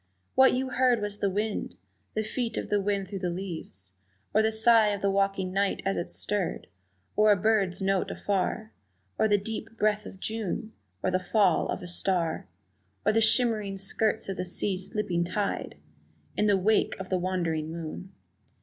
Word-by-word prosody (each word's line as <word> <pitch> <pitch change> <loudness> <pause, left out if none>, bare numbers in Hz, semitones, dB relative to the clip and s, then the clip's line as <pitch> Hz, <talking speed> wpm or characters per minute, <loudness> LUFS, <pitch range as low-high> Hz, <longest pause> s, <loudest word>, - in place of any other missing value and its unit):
what 265 0 +6
you 260 +1 -1
heard 250 -2 +3
was 205 0 -4
the 200 - +1
wind, 210 +2 -2 0.4
The 215 - +1
feet 230 +1 -2
of - - -3
the 205 -1 +3
wind 200 -1 -1
through 195 0 -5
the 180 -1 -1
leaves, 165 - -6 0.4
Or 215 - +5
the 220 0 +2
sigh 220 0 +5
of 205 -1 -1
the 200 - +3
waking 195 -1 0
night 200 +1 0
as 195 - +1
it 170 - -3
stirred. 205 -3 -2 0.5
Or 210 0 +5
a - - +6
bird's 195 -2 +1
note 195 -1 +1
afar, 205 +2 -2 0.5
Or 220 - +4
the 205 -1 +4
deep 225 +2 -6
breath 210 -1 +1
of 190 - -11
June, 220 0 -3 0.3
Or 185 - +1
the 185 - +2
fall 185 -1 +2
of - - -3
a - - -6
star, 175 - -1 0.6
Or - - +4
the 225 - +3
shimmering 220 -3 +2
skirts 215 +3 -1
of 195 - -4
the 180 - -1
sea 185 +2 0
slipping 185 -2 -1
tide 195 +3 -2 0.6
In 210 - +2
the 200 -1 +4
wake 210 +3 +2
of 190 - -6
the 185 - +1
wandering 170 -4 -1
moon! 170 +3 -6
200 Hz, 185 wpm, -28 LUFS, 185-215 Hz, 0.6 s, what